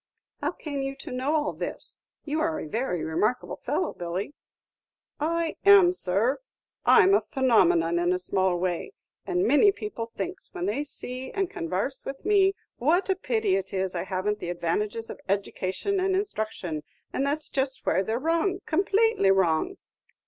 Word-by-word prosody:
"How - - -1
came 285 -3 -5
you 270 0 -3
to 275 +1 -9
know 260 +5 0
all 295 -1 0
this? - - -6 0.3
You 305 +1 -1
are 320 0 0
a - - -5
very 220 -3 -2
remarkable 215 +10 -1
fellow, - - -1
Billy." 175 +9 -4 0.9
"I 330 +2 -1
am, 400 -3 +7
sir; 215 - +1 0.5
I'm 385 - +7
a 395 - +5
phenumenon 175 - +3
in 175 +1 +2
a 180 - +2
small 185 0 +1
way. 180 - -2 0.3
And 360 +1 +1
many 395 +7 +6
people 385 - -5
thinks, 365 +1 -6
when 360 0 -2
they 295 -7 0
see 260 -2 -6
and 390 -3 -1
convarse 185 +11 -3
with 270 0 -7
me, 390 -2 +4 0.2
what 345 +9 +2
a - - +2
pity 225 - 0
it 195 0 -3
is 190 -1 -1
I 175 0 -3
hav' 190 +1 -3
n't 210 0 0
the 175 - -5
advantages 205 +6 -2
of - - -10
edication 200 - -1
and 380 0 +1
instruction; 215 - -3 0.3
and 270 - 0
that's 295 +2 -1
just 265 -1 -2
where 190 - +2
they 220 +3 -2
're - - +1
wrong, 335 +6 0
complately 400 - +2
wrong." 190 - +2
260 Hz, 170 wpm, -27 LUFS, -, 0.9 s, am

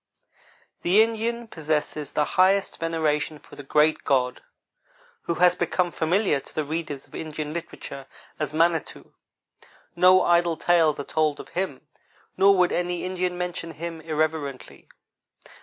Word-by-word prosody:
The 195 +5 +5
Indian 230 +1 -2
possesses 155 -4 -2
the 150 - +2
highest 190 +3 +2
veneration 160 -2 -1
for - - -16
the - - -8
Great 150 +3 +2
God, 125 -2 +1 0.8
who 170 - -1
has 180 +1 +5
become 175 0 0
familiar 170 -1 +1
to - - -16
the 155 - 0
readers 155 -2 -4
of - - -27
Indian 155 -1 -5
literature 160 -5 -7 0.3
as 150 -1 -2
Manitou. 165 +1 0 0.8
No 185 +1 +6
idle 170 -1 +2
tales 165 -4 +3
are - - -2
told 155 0 0
of - - -10
Him, 180 -7 -4 0.5
nor 195 +1 +5
would 180 -1 +3
any 175 0 -2
Indian 180 -1 -2
mention 175 -2 -4
Him 165 +1 -6
irreverently. 155 -3 -3
165 Hz, 140 wpm, -25 LUFS, 150-180 Hz, 0.8 s, No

